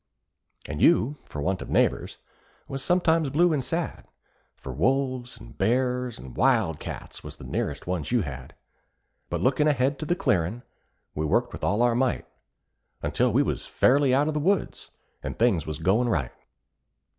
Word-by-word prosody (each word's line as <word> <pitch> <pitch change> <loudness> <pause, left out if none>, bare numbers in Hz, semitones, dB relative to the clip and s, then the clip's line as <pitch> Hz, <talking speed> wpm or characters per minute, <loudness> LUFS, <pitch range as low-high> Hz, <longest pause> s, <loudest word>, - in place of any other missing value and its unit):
And 75 +2 -5
you, 150 -4 +4
for 75 - -6
want 95 +2 -1
of - - -7
neighbors, - - +1 0.5
was 135 0 -4
sometimes 165 -4 +2
blue 165 +4 +3
and 140 -4 0
sad, 165 +6 -3 0.5
For 65 - -7
wolves 130 - 0
and - - -13
bears 125 +3 0
and 65 -2 -11
wild 80 -2 +2
cats - - -8
was - - -7
the - - -13
nearest 70 -1 -3
ones 90 -1 -3
you 120 -2 +3
had; 65 -4 -8 0.7
But - - -2
lookin' 140 +4 +3
ahead 140 -1 +1
to 155 - -4
the 175 - +2
clearin', 110 - 0 0.5
we 75 +1 -2
worked 120 +9 +1
with - - -8
all 105 +4 +2
our 120 -1 +3
might, 125 +1 0 0.8
Until - - +1
we - - +3
was - - -3
fairly 140 +1 +3
out 140 +3 +3
of 155 - 0
the 150 - 0
woods, 195 +6 0 0.3
and - - -5
things 105 -10 +2
was 80 - -3
goin' 100 +10 +2
right. 75 - 0
125 Hz, 170 wpm, -26 LUFS, 90-140 Hz, 0.8 s, you